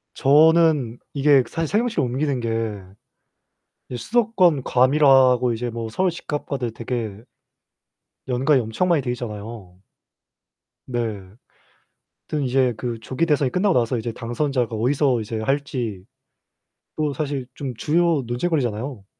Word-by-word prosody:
저는 150 -4 +4
이게 140 -2 +4
사실 165 -1 -2
세종시로 230 - 0
옮기는 130 +2 -1
게 115 - -3 1.4
이제 125 - -5
수도권 185 - +2
과밀화하고 130 -2 +4
이제 120 +2 -3
뭐 115 -1 -5
서울 185 +11 +1
집값과도 140 -7 -4
되게 115 -3 -5 1.1
연관이 130 +2 +2
엄청 115 +11 -1
많이 165 -5 +3
돼 125 - -3
있잖아요. 105 -5 -7 1.1
네. 120 -2 -2 1.3
하여튼 150 -2 -1
이제 125 -1 +2
그 115 0 -4
조기 130 +8 -1
대선이 145 -5 +1
끝나고 190 -2 +2
나서 120 0 +1
이제 115 +1 -3
당선자가 120 0 -2
어디서 130 +2 +1
이제 110 +1 -4
할지 120 -6 -2 0.9
또 150 -2 0
사실 140 -2 -3
좀 135 -3 -5
주요 165 +1 +1
논쟁거리잖아요. 120 - -2
130 Hz, 280 characters per minute, -22 LUFS, 120-150 Hz, 1.4 s, 저는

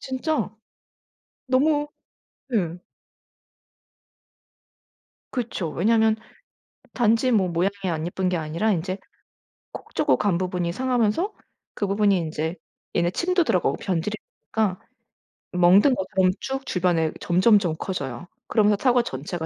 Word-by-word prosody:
진짜 265 +1 -2 1.0
너무 295 +3 +2 0.6
네. 180 -8 -1 2.5
그쵸. 230 -9 -3
왜냐하면 220 +5 +2 0.8
단지 235 +1 +2
뭐 195 -5 +3
모양이 175 +3 +1 0.2
안 160 -1 -2
예쁜 185 +1 -1
게 180 - 0
아니라 165 +7 -1
인제 185 +1 -2 0.7
콕 - - -10
쪼고 - - +3
간 200 -5 +1
부분이 180 -2 -2
상하면서 255 - +1 0.4
그 205 - -1
부분이 200 -1 +3
인제 160 0 -3 0.4
얘네 175 0 +2
침도 355 - +1
들어가고 180 - +1
변질이 190 +3 -2 0.4
되니까 210 -4 +1 0.7
이 - - -3
멍든 190 +9 +6
것처럼 190 -1 +1
쭉 270 0 -4
주변에 170 -3 +1
점점점 185 -1 +3
커져요. 145 -5 -4 0.2
그러면서 210 -2 +3
사과 250 -2 +4
전체가 160 - -5
195 Hz, 255 characters per minute, -24 LUFS, 175-235 Hz, 2.5 s, 멍든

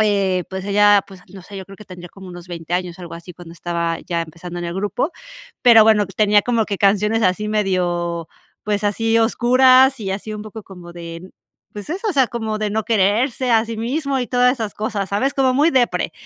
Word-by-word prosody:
eh, 195 -4 +1
pues 190 0 -5
ella, 205 0 +4
pues, 190 -2 -14
no 190 - -10
sé, 200 +2 -11
yo 190 - -7
creo 195 +1 -14
que 215 - -13
tendría 175 -1 -11
como 190 +1 -13
unos 175 0 -10
20 170 0 -5
años, 180 -1 -3
algo 170 -1 -8
así, 170 +2 -11
cuando 175 -2 -12
estaba 170 -1 -3
ya 170 -2 -1
empezando 170 +2 -9
en 175 - -4
el 170 - -5
grupo. 205 - -2 0.5
Pero 230 -3 +8
bueno, 210 -2 +4
tenía 205 +1 +2
como 235 -2 0
que 200 -2 -4
canciones 210 +3 +2
así 200 +3 0
medio, 175 -5 -1 0.4
pues, 210 0 -1
así 225 +2 +1
oscuras 255 +3 +4
y 195 -2 -4
así 210 +2 -6
un 210 - -7
poco 215 0 -9
como 180 -3 -12
de, 170 +1 -9 0.4
pues 205 +7 -8
eso, 390 +6 -4
o 400 - 0
sea, 265 -4 +2
como 220 -2 -4
de 215 -1 -2
no 220 +1 -2
quererse 230 +4 +1
a 225 -1 +4
sí 230 -1 -6
mismo 270 +4 -2
y 245 - -4
todas 250 0 +3
esas 220 -4 -5
cosas, 210 -2 -3
¿sabes? 255 +8 0
Como 260 -2 +2
muy 300 +5 +3
depre. 255 -4 0
205 Hz, 220 wpm, -19 LUFS, 180-230 Hz, 0.5 s, Pero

